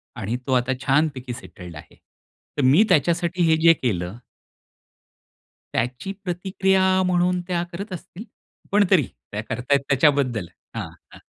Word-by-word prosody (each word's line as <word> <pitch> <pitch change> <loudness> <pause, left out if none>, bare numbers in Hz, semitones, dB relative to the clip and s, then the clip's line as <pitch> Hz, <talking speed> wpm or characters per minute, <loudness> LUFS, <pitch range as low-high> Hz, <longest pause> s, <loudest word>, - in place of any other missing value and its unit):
आणि 110 +5 -3
तो 130 - +1
आता 125 +1 +2
छानपैकी 135 -2 0
सेटल्ड 90 -8 -11
आहे. 75 - -12
तर 145 - -11
मी 140 +11 +6
त्याच्यासाठी 175 +1 +2
हे 160 - +5
जे 165 0 +7
केलं 100 - -3 1.6
त्याची 125 +10 -2
प्रतिक्रिया 190 +1 +1 0.2
म्हणून 180 0 +1
त्या 175 -2 -1
करत 200 +4 -7
असतील, 180 +3 -9 0.5
पण 205 0 +4
तरी 180 -6 +5 0.3
त्या 105 - -3
करताय 130 +3 +1
त्याच्याबद्दल 135 - +2 0.3
हां, - - -4 0.2
हां. - - -13
150 Hz, 130 wpm, -23 LUFS, 125-180 Hz, 1.6 s, जे